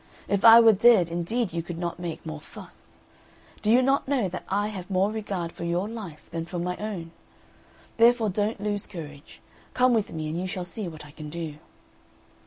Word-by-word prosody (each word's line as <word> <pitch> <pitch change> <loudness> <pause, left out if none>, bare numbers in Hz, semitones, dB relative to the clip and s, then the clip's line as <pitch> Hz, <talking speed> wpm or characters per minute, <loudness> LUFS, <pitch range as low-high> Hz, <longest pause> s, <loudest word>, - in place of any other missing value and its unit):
If 200 0 0
I 230 0 +10
were 225 -1 +7
dead 200 -5 +5
indeed 180 +5 -1
you 170 - -1
could 170 0 -7
not 175 0 -4
make 170 -2 -6
more 155 -1 -6
fuss. - - -14 0.6
Do 210 - 0
you 245 +3 +5
not 270 +1 +2
know 265 -7 +1
that 180 - -6
I 205 +2 0
have 190 -3 -7
more 195 +2 +2
regard 195 -6 -4
for 170 - -8
your 175 +3 -1
life 210 -9 -8
than 165 0 -4
for 180 - -5
my 180 +1 -2
own? 195 -6 -5 0.9
Therefore 230 -1 +5
don't 205 +3 -1
lose 205 0 -2
courage; 150 -5 -10 0.3
come 255 0 +4
with 220 -3 0
me, 155 -1 -4
and 165 +3 -3
you 185 - -3
shall 185 -1 -4
see 185 +3 -5
what 155 -3 -9
I 145 - -13
can 150 0 -9
do." 160 -2 -6
185 Hz, 200 wpm, -26 LUFS, 170-215 Hz, 0.9 s, I